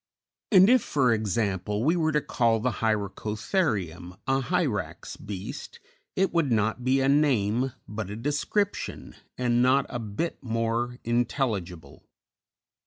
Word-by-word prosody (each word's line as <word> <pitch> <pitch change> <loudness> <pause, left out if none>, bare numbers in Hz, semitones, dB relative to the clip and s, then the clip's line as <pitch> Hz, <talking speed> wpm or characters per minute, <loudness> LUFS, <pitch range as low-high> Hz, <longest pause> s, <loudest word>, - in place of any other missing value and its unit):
And 190 -2 +8
if, 250 +1 +5
for 130 -9 +2
example, 105 -1 -1
we 160 +6 +3
were 160 -2 +1
to 150 -1 +1
call 115 -4 +1
the 120 -1 -1
Hyracotherium 105 - -1
a 135 0 +1
Hyrax 140 - -2
beast 105 - -7 0.4
it 190 -3 +1
would 165 -6 +1
not 110 +2 +1
be 130 +2 +2
a 135 - +2
name, 130 -4 +2
but 105 -1 -5
a 105 - -5
description, 150 - -2 0.2
and 120 -1 +2
not 130 +2 +4
a 120 - -4
bit 115 +10 -4
more 115 0 -1
intelligible. 110 - -2
120 Hz, 130 wpm, -27 LUFS, 105-140 Hz, 0.4 s, And